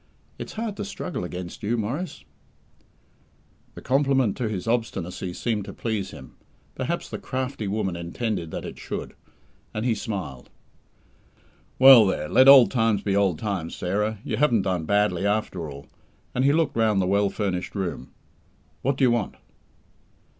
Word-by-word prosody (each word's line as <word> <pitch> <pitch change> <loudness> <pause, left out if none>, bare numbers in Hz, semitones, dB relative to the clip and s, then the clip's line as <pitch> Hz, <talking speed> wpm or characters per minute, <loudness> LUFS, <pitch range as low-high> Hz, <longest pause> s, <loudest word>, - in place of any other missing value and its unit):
It's - - -7
hard 220 -2 -4
to - - -3
struggle 190 - -5
against 90 0 -7
you, 115 +3 0
Maurice." 130 - -4 1.5
The - - -10
compliment 135 -4 +2
to 120 -4 -1
his 100 -1 -4
obstinacy 95 -6 -2
seemed 105 +2 -2
to - - -8
please 110 -4 -3
him 65 - -12 0.4
perhaps - - -3
the - - -6
crafty 130 -4 -4
woman 95 -3 -1
intended 85 +1 -3
that - - -6
it - - -8
should - - -6 0.6
and 110 +2 -2
he 120 - +3
smiled. 95 - -5 1.3
"Well, 130 -5 +9
there; 75 -5 -1
let 130 - +5
old 135 -3 +9
times 115 -4 +1
be 100 -1 0
old 100 -5 +2
times, 95 -5 -3
Sarah. 105 +4 -1
You - - -3
haven't 120 -8 +3
done 90 -4 -1
badly, 100 -1 +1
after 100 -6 -1
all," 70 0 -10 0.5
and 125 - +1
he 140 - +5
looked 150 -2 +1
round 110 -3 +2
the 95 - +2
well 100 +2 +2
furnished 95 -3 -3
room. 90 -9 -4 0.7
"What 135 +1 0
do 140 - +1
you 125 - +5
want?" 120 -4 -1
105 Hz, 160 wpm, -25 LUFS, 95-125 Hz, 1.5 s, Well